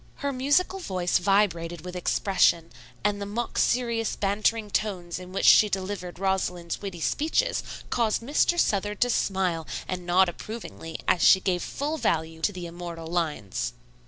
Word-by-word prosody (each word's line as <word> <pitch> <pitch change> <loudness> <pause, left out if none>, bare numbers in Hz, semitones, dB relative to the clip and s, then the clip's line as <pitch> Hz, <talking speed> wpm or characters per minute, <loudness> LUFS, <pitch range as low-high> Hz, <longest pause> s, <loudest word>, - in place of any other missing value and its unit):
Her 280 -1 -3
musical 290 +9 +1
voice 185 - 0
vibrated 175 -3 +1
with 180 0 -7
expression 180 -2 +2 0.3
and 205 0 0
the 200 - -3
mock 230 +4 -3
serious 235 -2 +1
bantering 210 +2 0
tones 185 -5 -2
in 180 0 -10
which 190 - -1
she 210 - +7
delivered 190 -2 -4
Rosalind's 180 -2 -1
witty 195 -4 -6
speeches 320 - +1 0.3
caused 230 -1 +1
Mr. 300 +6 +2
Southard 205 - +1
to 245 - +4
smile 185 -7 0 0.2
and 180 -1 -4
nod 180 +2 +4
approvingly 175 -3 -7
as 175 - +3
she 190 - +7
gave 185 -2 0
full 300 - -3
value 160 - -1
to 205 - +2
the 180 -3 -7
immortal 170 -1 -7
lines. 150 - -2
190 Hz, 155 wpm, -26 LUFS, 175-215 Hz, 0.3 s, she